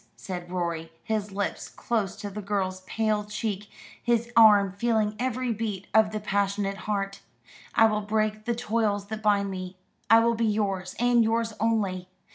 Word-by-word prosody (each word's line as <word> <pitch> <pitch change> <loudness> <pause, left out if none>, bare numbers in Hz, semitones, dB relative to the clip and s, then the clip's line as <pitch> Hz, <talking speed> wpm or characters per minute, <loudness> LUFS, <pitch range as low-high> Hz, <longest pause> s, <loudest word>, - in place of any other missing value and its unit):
said 175 -2 -7
Rorie, 170 -2 -3
his 215 -2 -2
lips 200 +1 -3
close 215 -5 -2
to 205 -1 -6
the 210 +2 -5
girl's 190 -2 -2
pale 215 -2 0
cheek, 210 -1 -4 0.3
his 235 0 +1
arm 210 -4 +7
feeling 215 0 0
every 255 -1 -1
beat 210 -3 -4
of 220 -1 +5
the 215 - -3
passionate 200 -1 -1
heart. 195 -1 -1 0.6
"I 225 - +7
will 215 -1 +2
break 215 0 -1
the 235 - 0
toils 210 -3 -1
that 220 0 -4
bind 200 -2 +2
me. 185 0 -6 0.3
I 225 +1 +8
will 235 0 +3
be 230 0 -1
yours, 195 -4 -1
and 240 -1 +4
yours 225 0 0
only. 200 -5 0
210 Hz, 165 wpm, -27 LUFS, 195-225 Hz, 0.6 s, I